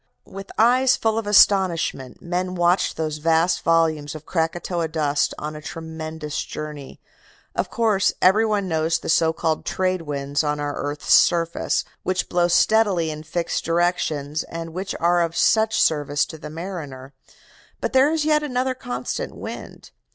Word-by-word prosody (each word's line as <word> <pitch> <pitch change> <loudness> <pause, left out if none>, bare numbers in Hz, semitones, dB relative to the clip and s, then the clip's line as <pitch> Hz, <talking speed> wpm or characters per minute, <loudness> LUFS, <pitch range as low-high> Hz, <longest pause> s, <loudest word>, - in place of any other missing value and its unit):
"With 195 0 -10
eyes 250 +3 +4
full 225 0 0
of 220 - -6
astonishment 185 -10 +3
men 180 +1 -2
watched 175 +1 +1
those 155 -1 -3
vast 165 +3 +2
volumes 160 -3 +1
of 155 0 -9
Krakatoa 170 0 -1
dust 150 -2 0
on 155 +1 -5
a 150 - -8
tremendous 160 -1 -6
journey. 150 -3 -8 0.6
Of - - -1
course, 215 -5 +2
every 190 +4 +5
one 210 -3 0
knows 160 -1 +1
the - - -7
so 160 0 +3
called 160 -1 -1
trade 185 -1 -1
winds 145 -1 -2
on 150 0 -1
our 145 0 -2
earth's 145 +1 -1
surface, 170 -1 +3 0.2
which 185 0 -2
blow 175 -1 +2
steadily 190 -3 +3
in 155 0 -7
fixed 165 +2 -3
directions, 160 -3 0
and 165 -1 -7
which 190 +3 -4
are 175 +1 +3
of 165 -1 -1
such 220 0 +3
service 145 -2 +2
to 160 - -10
the 150 - -8
mariner. 150 -6 -7 0.7
But - - -3
there 265 +3 +5
is 320 -2 0
yet 305 -1 +3
another 260 -2 -1
constant 255 - -5
wind. - - -9
165 Hz, 160 wpm, -22 LUFS, 155-195 Hz, 0.7 s, every